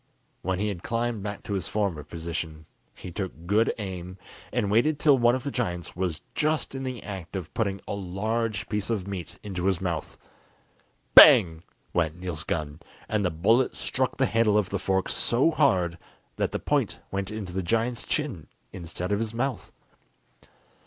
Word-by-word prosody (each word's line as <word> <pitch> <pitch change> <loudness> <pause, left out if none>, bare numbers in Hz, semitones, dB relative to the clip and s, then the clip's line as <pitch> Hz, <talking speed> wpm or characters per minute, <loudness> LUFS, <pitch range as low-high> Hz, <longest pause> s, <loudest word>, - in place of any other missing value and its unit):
When 95 +1 -1
he 105 +2 0
had 95 -4 -5
climbed 115 -1 -1
back 100 0 -5
to 100 - -4
his 95 -4 -2
former 100 -8 -1
position, 80 0 -5 0.3
he 90 - -9
took 90 -2 -5
good 105 +5 +3
aim, 95 -3 -6 0.3
and 105 -4 0
waited 130 +8 +3
till 150 -1 +5
one 120 -1 +4
of 130 - -4
the 140 - -3
giants 90 -10 -3
was 90 -4 -2
just 155 -1 0
in 135 - -4
the 130 -4 -4
act 95 -3 -7
of 90 -4 -5
putting 100 -4 -1
a - - -3
large 105 +3 -2
piece 105 0 -2
of 100 -5 -1
meat 95 -5 -6
into 95 -3 -4
his 95 -3 +2
mouth. 85 -5 -3 1.0
Bang! 80 -2 +9 0.3
went 80 -2 +1
Niels' 90 -4 -3
gun, 75 -2 -3 0.3
and 105 -1 0
the 90 - +2
bullet 110 +10 +2
struck - - -1
the - - +3
handle 110 0 +3
of 105 -3 +1
the 100 - -1
fork 95 0 0
so 130 +8 +3
hard 85 - +2 0.4
that - - 0
the - - -1
point - - 0
went 95 0 -2
into 105 -5 -6
the 95 - -1
giant's 115 +6 0
chin, 125 - -2 0.3
instead 90 +1 -5
of 100 - +2
his 115 0 -2
mouth. 130 0 -2
100 Hz, 180 wpm, -27 LUFS, 90-115 Hz, 1.0 s, Bang